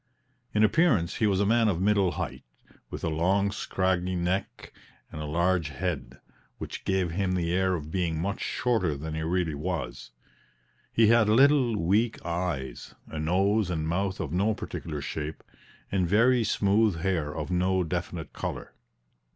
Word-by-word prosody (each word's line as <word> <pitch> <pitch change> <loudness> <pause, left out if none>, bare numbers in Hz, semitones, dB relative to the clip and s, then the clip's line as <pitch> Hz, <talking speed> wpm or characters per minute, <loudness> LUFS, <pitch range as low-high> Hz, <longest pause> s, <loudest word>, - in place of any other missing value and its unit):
In 105 - +4
appearance 110 - +3
he 110 - +2
was 95 -2 +1
a 100 - +2
man 115 +2 +3
of 95 -5 +1
middle 100 -2 +2
height, - - -5 0.5
with - - -7
a - - 0
long 95 +6 +1
scraggy 95 -3 -1
neck 90 +2 -3 0.4
and 75 - -6
a - - -4
large 85 0 +1
head, 70 -6 -4 0.4
which - - -7
gave 95 -3 +1
him 95 +1 -1
the 85 -2 0
air 95 0 +2
of 75 -2 -6
being 85 -3 -1
much 100 +5 -2
shorter 95 - 0
than 80 +2 -5
he 80 - -3
really 85 0 0
was; 80 -5 -4 0.8
he 110 -1 +4
had 115 -2 +5
little, 130 -1 +4
weak 105 +7 +1
eyes, 85 -8 -3
a 80 - -5
nose 95 +5 +2
and 80 -3 -2
mouth 95 +3 -1
of 75 - -3
no 105 +4 +1
particular 75 -7 -5
shape, 75 +2 -5 0.5
and 95 -3 +1
very 120 +4 +4
smooth 100 -3 +2
hair 85 -6 0
of 75 +3 -4
no 90 +1 +2
definite 85 -1 -4
color. - - -5
90 Hz, 160 wpm, -27 LUFS, 80-100 Hz, 0.8 s, had